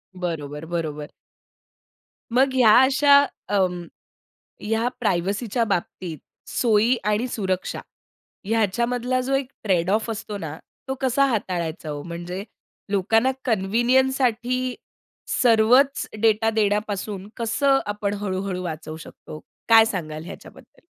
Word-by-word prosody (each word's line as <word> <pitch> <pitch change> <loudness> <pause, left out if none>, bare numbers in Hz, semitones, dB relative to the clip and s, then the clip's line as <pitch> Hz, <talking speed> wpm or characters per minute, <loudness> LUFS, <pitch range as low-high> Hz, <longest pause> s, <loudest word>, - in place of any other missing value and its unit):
बरोबर, 160 -4 -5
बरोबर. 155 -3 -4 1.2
मग 260 +2 +3
ह्या 240 -5 +6
अशा 280 +2 +5 0.3
अ, 205 - +1 1.0
ह्या 225 +3 0
प्रायव्हसीच्या 200 +3 0
बाबतीत, 180 -4 -3 0.3
सोयी 230 +1 +3
आणि 210 +4 +1
सुरक्षा 190 -6 -3 0.6
ह्याच्यामधला 235 +4 0
जो 270 +2 -2
एक 270 -1 -2
ट्रेड 185 -4 +1
ऑफ 220 +3 +1
असतो 215 -1 -5
ना, 160 -4 -6 0.3
तो 265 - -1
कसा 265 +1 +3
हाताळायचा 180 - -2
हो, 145 -1 -4
म्हणजे 175 +3 -6 0.5
लोकांना 225 +6 +2
कन्व्हिनियन्ससाठी 250 +3 +1 0.7
सर्वच 245 +4 +4
डेटा 225 0 +3
देण्यापासून 205 -2 -1
कसं 270 +4 +2
आपण 205 -1 -2
हळू-हळू 185 -2 -3
वाचवू 160 -2 -6
शकतो? 155 -1 -11 0.3
काय 225 -1 +8
सांगाल 160 -7 -4
याच्याबद्दल? 330 - -13
215 Hz, 105 wpm, -23 LUFS, 180-245 Hz, 1.2 s, काय